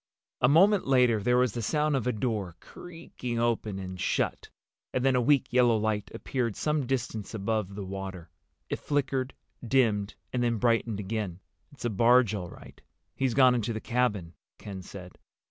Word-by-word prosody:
A 125 - +5
moment 190 +6 +5
later 125 -5 +4
there 125 +4 +2
was 125 -4 +2
the 120 - -3
sound 150 +6 +1
of 125 -2 -1
a - - +3
door 105 -6 -2
creaking 165 - -7
open 115 -4 0
and 95 -1 -6
shut, - - -1 0.4
and 130 0 -1
then 135 -1 +4
a 125 - +3
weak 135 0 +2
yellow 120 -2 +4
light 105 -1 -1
appeared 120 -6 -2
some 150 -4 -1
distance 120 -5 -3
above 105 -1 -2
the 100 -1 -5
water. 95 -3 -7 0.4
It - - -3
flickered, 135 -2 -1 0.3
dimmed, 110 -5 +1 0.2
and 125 - 0
then 120 -1 +1
brightened 115 -2 +1
again. 100 -3 -3 0.3
"It's 140 - -9
a 120 - 0
barge 115 +1 +4
all 90 -4 -4
right. - - -14 0.3
He's 130 -3 0
gone 130 -2 +6
into 115 -1 -1
the 110 - -3
cabin," 105 -9 -1 0.2
Ken 95 -2 -8
said. 90 -1 -11
115 Hz, 175 wpm, -28 LUFS, 100-130 Hz, 0.4 s, gone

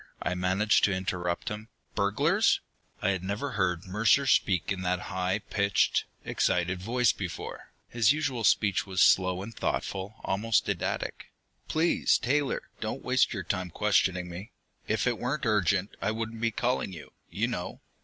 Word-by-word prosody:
I 90 - 0
managed 95 +4 +2
to 105 - +1
interrupt 90 -2 -2
him. 105 +2 -7 0.2
"Burglars?" 100 0 +2 0.4
I 95 - +3
had 95 -2 -1
never 105 +9 -3
heard 90 -2 0
Mercer 105 +8 +3
speak 95 - +2
in 95 -2 -2
that 90 0 -2
high 95 +1 0
pitched, 100 -1 +2 0.2
excited 90 +1 0
voice 120 +4 +2
before; 90 -4 -7 0.2
his 115 0 +3
usual 145 -6 -1
speech 100 -2 +3
was 95 -1 +3
slow 95 0 +3
and 115 +3 -9
thoughtful, 100 +2 -3
almost 105 +2 +1
didactic. - - -3 0.4
"Please, 160 +2 +2
Taylor, 140 +2 0 0.2
don't - - -4
waste - - +3 0.2
time 90 -1 -1
questioning 95 -1 +1
me. 90 +5 -8 0.4
If 110 -1 0
it 120 -3 0
weren't 135 +4 -2
urgent, 100 -2 +1
I 100 - 0
wouldn't 110 +1 -4
be 115 - +2
calling 120 -2 -1
you, 80 -4 -10 0.2
you - - -1
know. - - -5
100 Hz, 155 wpm, -28 LUFS, 95-115 Hz, 0.4 s, I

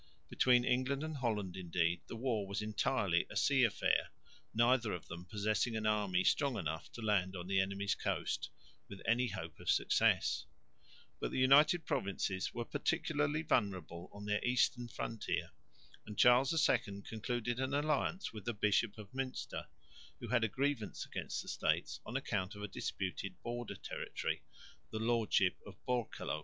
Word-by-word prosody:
Between 125 -1 +4
England 130 +3 +1
and 155 -1 -4
Holland 105 -7 -1
indeed 85 -2 0
the - - -6
war 115 -4 -1
was 100 +2 -2
entirely 105 -4 +1
a - - -9
sea 135 -2 +4
affair, 115 - +2 0.4
neither 120 0 +3
of 90 - -5
them 85 +2 -7
possessing 110 +4 0
an 110 -1 -2
army 100 -4 +2
strong 140 -5 +2
enough 80 0 -4
to 120 - -7
land 95 -3 +1
on 90 -1 -5
the 95 +1 +2
enemy's 100 +1 0
coast - - -2 0.4
with 100 - -8
any 120 +2 +3
hope 80 -7 -6
of - - -5
success; - - +3 0.7
but - - -1
the - - -4
United 150 +5 +6
Provinces 95 -1 -1
were 120 -1 -4
particularly 150 +2 0
vulnerable 95 - -1
on 100 0 -9
their 105 0 0
eastern 125 0 +2
frontier, 115 -1 -3 0.6
and 105 -1 -7
Charles 125 +2 +6 0.2
II 100 -5 0
concluded 120 +2 -2
an 135 +1 0
alliance 155 - 0
with 105 -3 -8
the 120 - -2
Bishop 105 +1 +2
of 105 -2 -10
Münster, 130 0 -4 0.5
who 120 - -7
had 120 -1 +3
a - - +4
grievance 130 -3 -1
against - - -4
the - - -16
States - - 0
on - - -1
account 95 -1 -2
of 105 - -7
a - - -2
disputed 95 -2 -4
border 120 0 -4
territory, - - -4 0.5
the 110 - -4
lordship 110 -5 +2
of - - -11
Borkelo. 120 -10 -1
110 Hz, 160 wpm, -35 LUFS, 100-125 Hz, 0.7 s, United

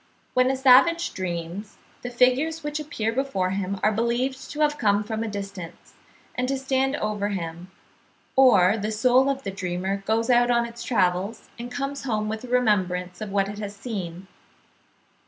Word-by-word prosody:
When 255 0 +3
a 270 - +1
savage 270 +6 +5
dreams, 175 +2 -5 0.2
the 245 - -5
figures 255 +7 +2
which 295 +1 -3
appear 285 -8 -2
before 215 -8 -1
him 195 0 -2
are 215 - +4
believed 240 +4 -1
to 300 - -4
have 295 -1 +2
come 205 -1 +2
from 220 +1 -4
a 225 - -2
distance, 195 -4 -7 0.4
and 255 - -1
to 270 +1 0
stand 265 +1 0
over 210 -5 -2
him; 175 -2 -5 0.7
or 215 -7 +6
"the 215 +1 -2
soul 255 +5 +3
of 275 0 -2
the 195 - -3
dreamer 190 0 -2
goes 225 +3 +1
out 240 0 +4
on 235 -1 +3
its 235 0 -9
travels, 190 -1 0
and 240 +1 -6
comes 275 +1 -4
home 215 -4 -1
with 220 +1 -4
a - - -7
remembrance 185 -7 0
of 215 - -4
what 195 -1 +1
it 205 +1 -7
has 205 -1 -6
seen." 195 -5 -6
220 Hz, 175 wpm, -25 LUFS, 195-255 Hz, 0.7 s, or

